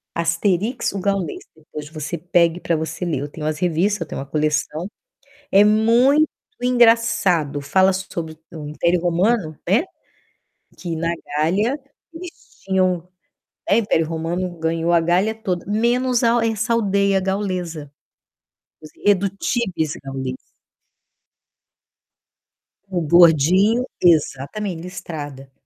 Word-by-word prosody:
Asterix, 180 +8 0
o 195 - -3
Gaulês. 195 -4 -2
Depois 150 -1 -10
você 155 +1 -5
pegue 170 0 +2
para 170 - 0
você 160 +3 -5
ler. 155 -6 -1
Eu 145 - -4
tenho 155 0 -7
as 155 0 -2
revistas, 180 +3 0
eu 165 - -3
tenho - - -6
uma - - -6
coleção. 155 +3 -1 0.6
É 200 +1 +7
muito 235 +8 +4 0.4
engraçado. 230 - +3
Fala 190 +6 +3
sobre 170 -4 -5
o 155 -3 -7
Império 170 +4 +1
Romano, 175 0 +1
né, 230 - +4 0.9
que 170 -3 -5
na 165 +1 -1 0.3
Gália 205 - +1 0.3
eles 345 +1 -8 0.3
tinham, 185 -2 0 0.6
né, 200 - +4
o - - +4
Império 165 -7 +1
Romano 165 +3 -2
ganhou 165 +1 0
a 170 - +5
Gália 180 +6 +1
toda, 185 -6 -4
menos 240 +4 +1
a 230 0 +3
essa 225 +1 -1
aldeia 200 -3 +2
gaulesa. 180 -6 -3 0.9
Os 155 - -11
Irredutíveis 195 - 0
Gauleses. 135 -1 -5 2.5
O 180 -2 -1
gordinho, 175 - +4 0.2
exatamente, 165 +3 +1
listrada. 150 -6 -7
Ele 135 - -22
180 Hz, 120 wpm, -21 LUFS, 160-205 Hz, 2.5 s, É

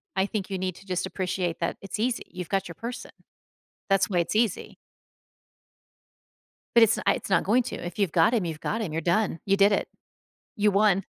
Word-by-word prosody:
I 190 0 +2
think 200 -1 -4
you 190 - -2
need 185 -1 -3
to 195 - -15
just 180 -1 -2
appreciate 185 -2 -2
that 170 - -2
it's 195 +1 -6
easy, 240 +1 0
you've 180 -2 -7
got 195 -1 0
your 170 - -9
person, 235 +7 -7 0.8
that's 195 +1 +3
why 180 - +1
it's 170 +5 -1
easy. 220 -4 0 2.0
But 235 - +7
it's 225 - +2
n - - -4
it's - - 0
not 190 - +3
going 235 +6 +3
to. - - -5
If 175 +4 -7
you've 195 -6 +1
got 165 +6 +4
him, 215 - +1
you've 160 -3 -5
got 225 - -2
him. 185 -9 -3
You're 165 - -2
done, 175 -1 +1
you 195 0 +2
did 200 +1 +5
it. 200 - 0 0.7
You 210 0 +3
won. 200 -1 +3
195 Hz, 210 wpm, -26 LUFS, 180-210 Hz, 2.0 s, But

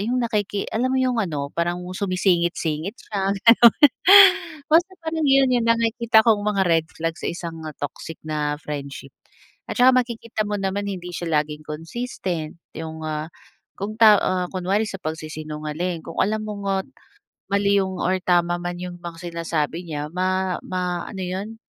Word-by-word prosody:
yung 235 +5 -1
nakiki 210 -4 -1
alam 245 +4 +1
mo 260 - 0
yung 255 -3 +1
ano 145 -7 -3
parang 175 +1 -2
sumisingit-singit 180 -1 0
siya, 195 -2 -3 0.2
gano'n. 235 0 +7 1.0
Basta 345 +4 +5 0.2
parang 320 0 -2
yun 270 -1 +4
yung 235 -2 +1
nakikita 230 -1 +3
kong 220 -3 +4
mga 205 -2 +1
red 165 -2 +2
flag 165 0 -1
sa - - -2
isang, 170 -1 -6
ah, 150 - -10
toxic 155 +2 -6
na 150 -1 -2
friendship 140 -2 -7 0.6
at - - -4
saka 255 +1 +6
makikita 235 -3 -1
mo 205 - -1
naman 195 +1 -2
hindi 180 -2 -5
siya 170 0 -4
laging 150 0 -10
consistent 165 -1 -5 0.2
yung, 160 0 -6
ah, 155 0 -3 0.5
kung 210 +2 -5
ta 215 -2 +8
ah, 180 -1 0
kunwari 190 +3 0
sa 195 - -5
pagsisinungaling 155 +2 -4
kung 165 - -9
alam 215 +3 +1
mong, 210 -1 -6
ah, 195 0 +1 0.7
mali 200 0 +3
yung 190 -1 -2
or 185 +1 +1
tama 175 -1 +2
man 175 0 -4
,yung 180 -1 -7
mga 170 0 -8
sinasabi 165 0 -2
niya 150 -1 -5
ma 185 +1 -1
ma 180 -1 -3
ano 190 -3 -6
yun, 195 +5 -4
185 Hz, 165 wpm, -23 LUFS, 165-215 Hz, 1.0 s, ta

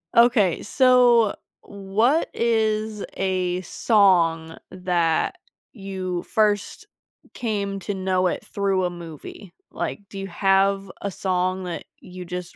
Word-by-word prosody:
Okay. 230 -6 +4
So, 245 -3 +4 0.3
what 205 +10 0
is 220 -2 0
a 185 -1 -1
song 170 -6 +2
that 175 -3 0 0.4
you 190 -4 -4
first 210 -2 0 0.5
came 200 -4 -3
to 205 - -3
know 185 -1 0
it - - -3
through 195 -2 0
a 180 - +1
movie? 170 +2 -10 0.2
Like, - - -4
do 195 - -8
you 195 - -5
have 195 +1 +1
a 200 - -2
song 185 0 -1
that 175 -2 -5 0.2
you 180 0 -10
just 180 0 -6
195 Hz, 120 wpm, -23 LUFS, 180-210 Hz, 0.5 s, Okay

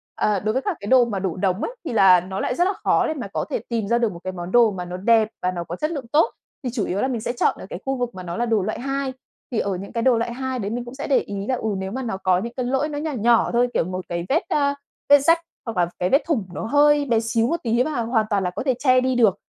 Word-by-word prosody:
Ờ, 210 -2 +1
đối 215 +3 -1
với 260 - 0
các 390 -2 -2
cái 200 - -7
đồ 255 +1 +6
mà 210 -5 -3
đổ 185 -3 -2
đống 185 +1 0
ấy - - -3
thì 280 - -3
là 190 -4 +7
nó 190 +2 -5
lại 250 - -1
rất 350 - +2
là 390 - 0
khó - - +3
để - - -1
mà 260 -9 -5
có - - -1
thể - - -1
tìm 230 -4 -1
ra 235 - +2
được 235 -3 +1
một 170 - -9
cái 185 - -4
món 175 0 -6
đồ 235 -1 +5
mà 180 -2 -5
nó 180 +1 -6
đẹp 220 +2 +3
và 180 - 0
nó 175 -1 -4
có 170 +1 -6
chất 305 - -2
lượng 280 -7 -5
tốt, 315 +10 +4 0.3
thì 250 - -2
chủ 225 -6 -1
yếu 195 +3 -2
là - - +1
mình 245 -4 -2
sẽ 240 - -2
chọn 240 - +1
ở - - -8
cái - - -6
khu 270 0 0
vực 245 -3 -3
mà 185 - -7
nó 170 -1 -5
là 240 - 0
đồ 225 -3 +2
loại 215 - -3
hai. 275 +1 -2 0.4
Thì 235 - 0
ở 195 -2 -1
những 195 +2 -8
cái 230 - -1
đồ 250 -2 +4
loại 230 +1 -2
hai 260 0 -3
đấy 200 -2 -3
mình 240 +1 -3
cũng 240 - -9
sẽ 280 - -5
để 275 - +4
ý 200 -1 -5
là, 260 - +1
ừ, 220 -3 -3
nếu 190 0 -4
mà 260 +4 -3
nó 225 -6 -3
có 185 -1 +2
những 235 +4 -5
cái 255 - -1
lỗi 265 +4 0
nó 290 - -4
nhỏ 310 +1 -2
nhỏ 235 -2 +3
thôi, 245 +1 +3
kiểu - - +2
một 185 +1 -5
cái 170 0 -3
vết, 320 +6 +3
a, 280 -1 +1 0.3
vết 285 0 +8
rách 330 +4 +4 0.3
hoặc 230 -4 -5
là 175 -1 +2
cái 180 - +1
vết 275 - +4
thủng 290 -11 0
nó - - -5
hơi 290 +3 +4
bé 235 -4 +2
xíu 230 0 0
một 335 - 0
tí 235 +1 +2
mà 285 -4 -2
hoàn 225 -1 +1
toàn 200 -2 +1
là 180 - 0
có 180 - -5
thể 260 - +3
che 255 -2 +4
đi 260 0 0
được, 220 -6 +4
235 Hz, 330 wpm, -22 LUFS, 195-265 Hz, 0.4 s, vết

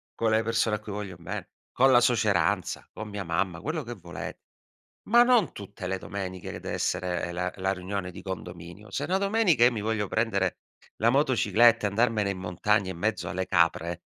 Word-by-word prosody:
con 115 -1 +1
le 110 - +4
persone 115 -1 +1
a - - -14
cui 105 0 -9
voglio 100 -3 -5
be 85 - -6 0.2
con 135 +1 +4
la 120 -1 +6
suoceranza, 100 -6 +1
con 110 - -6
mia 100 -1 -4
mamma, 85 0 -1
quello 155 - -3
che 120 0 -6
volete. 90 -5 -8 0.7
Ma 240 +2 +7
non 245 -3 +3
tutte 100 -1 -9
le 95 0 -2
domeniche, 95 -2 -6
che - - -7
dev'essere 90 -1 -2
la 90 +1 -2
la 95 +1 0
riunione 95 0 -4
di - - -10
condominio. 90 +1 -8
Se - - -2
una 190 +2 +1
domenica 200 - +3
io 125 - +5
mi 110 -3 -3
voglio 105 -2 -1
prendere, 100 -4 0 0.4
la 115 +2 +3
motocicletta 120 -4 +4
e - - -1
andarmene 105 -1 +1
in 95 - -6
montagna 95 +2 0
in 90 - -8
mezzo 110 -1 -1
alle 95 +1 -2
capre, 85 -1 +1
100 Hz, 190 wpm, -27 LUFS, 90-115 Hz, 0.7 s, Ma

